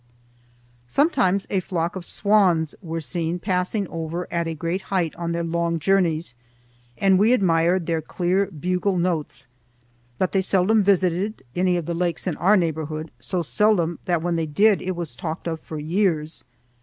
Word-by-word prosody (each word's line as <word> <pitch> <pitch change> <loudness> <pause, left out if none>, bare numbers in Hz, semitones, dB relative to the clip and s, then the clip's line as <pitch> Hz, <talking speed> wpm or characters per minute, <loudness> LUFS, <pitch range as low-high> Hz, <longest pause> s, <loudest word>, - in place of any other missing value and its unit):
Sometimes 200 - +2
a 195 - +2
flock 175 -2 -2
of 185 -2 -6
swans 185 -7 +2
were 165 -3 -4
seen 165 +2 -2
passing 185 +2 -1
over 165 +2 -4
at 170 -1 0
a 165 - -3
great 170 +4 -2
height 180 -5 0
on 170 -1 -3
their 170 0 -1
long 170 0 0
journeys, 170 -5 +1 0.6
and 190 -1 +4
we 220 +4 +5
admired 175 -4 +2
their 165 -1 0
clear 180 +5 0
bugle 180 +3 -1
notes, 170 -6 -2 0.7
but 185 - 0
they 195 - +2
seldom 195 +3 +3
visited 190 +1 +1
any 180 0 +2
of 170 - -3
the 170 - -2
lakes 175 0 -1
in 180 -5 -1
our 200 +5 +4
neighborhood, 160 -2 -2
so 180 -3 -2
seldom 175 -1 +2
that 170 -3 0
when 175 -1 0
they 160 -1 -1
did 200 +7 +3
it 185 0 -3
was 170 -3 -5
talked 160 -2 -5
of 160 -1 -3
for 155 - -8
years. 160 -1 -1
175 Hz, 170 wpm, -23 LUFS, 165-190 Hz, 0.7 s, we